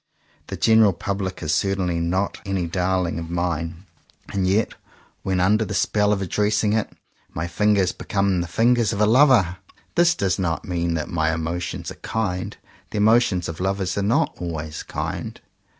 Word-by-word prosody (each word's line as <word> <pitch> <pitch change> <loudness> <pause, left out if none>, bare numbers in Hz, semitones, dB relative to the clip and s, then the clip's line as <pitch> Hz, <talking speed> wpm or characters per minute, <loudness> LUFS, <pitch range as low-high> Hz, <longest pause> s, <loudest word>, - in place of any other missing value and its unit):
The - - -5
general 110 -3 +5
public 95 -1 -4
is 75 -1 0
certainly 95 -2 0
not 90 +4 -1
any 95 -3 -1
darling 90 0 -1
of 80 0 -6
mine; 85 0 -3 0.5
and 95 -2 0
yet 105 +4 +1 0.5
when 95 -1 -1
under 105 +5 +3
the 105 -1 -4
spell 105 -1 +2
of 100 -2 0
addressing 105 +3 +1
it 110 -1 0 0.5
my 80 - -2
fingers 100 0 +2
become 100 -3 0
the 85 - -4
fingers 115 +4 +2
of 100 - -3
a 105 - +5
lover. 115 - +4 0.4
This 175 0 +4
does 95 -2 0
10 95 - -1
JOHN 85 - +1
COWPER - - -8
POWYS - - -8
not - - -2
mean 85 0 0
that 80 - -3
my 80 -2 +1
emotions 80 +2 -3
are - - -13
kind. 90 -5 -3 0.3
The - - -5
emotions 105 -4 +3
of 80 - -6
lovers 95 -1 -1
are 100 - 0
not 105 +4 +1
always 80 -3 -5
kind. - - -5
95 Hz, 180 wpm, -23 LUFS, 85-105 Hz, 0.5 s, general